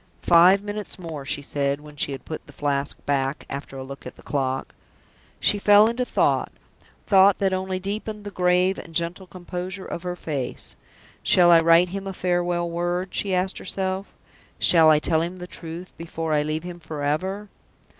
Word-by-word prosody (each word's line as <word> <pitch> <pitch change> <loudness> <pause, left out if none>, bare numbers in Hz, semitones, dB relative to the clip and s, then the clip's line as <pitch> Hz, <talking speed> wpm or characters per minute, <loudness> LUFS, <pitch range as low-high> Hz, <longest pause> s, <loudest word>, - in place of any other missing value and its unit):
"Five 180 +4 +6
minutes 205 0 -5
more," 160 -6 -7
she 145 +1 -2
said, 140 0 -1
when 150 0 -13
she 145 - 0
had 135 - -7
put 155 - -7
the - - -14
Flask 140 -1 -1
back, 140 0 -1
after 140 0 -6
a 130 - -5
look 140 +1 -9
at - - -10
the - - -17
clock. 135 -2 -2 0.7
She 205 - +3
fell 205 +1 +6
into 240 +2 -1
thought - - +1 0.5
thought 195 0 +5
that 195 -1 +1
only 185 0 -2
deepened 210 +2 -5
the 205 - -7
grave 180 +1 +2
and 165 - -11
gentle 170 +3 -2
composure 185 +1 -6
of 170 - -5
her 180 0 -4
face. 145 -7 -5 0.5
"Shall 175 -1 +5
I 170 - +8
write 165 +2 +5
him 195 +1 -5
a 195 - -4
farewell 175 -1 0
word?" 175 +2 -2
she 195 -2 0
asked 185 +1 -1
herself. 190 0 -4 0.4
"Shall 165 -2 +7
I 155 - +6
tell 160 +1 +1
him 175 +2 -4
the 180 - -7
truth 170 0 -8
before 165 -1 -4
I 150 - +3
leave 155 +2 -2
him 175 -1 -8
forever?" 160 +6 -3
175 Hz, 185 wpm, -24 LUFS, 155-190 Hz, 0.7 s, I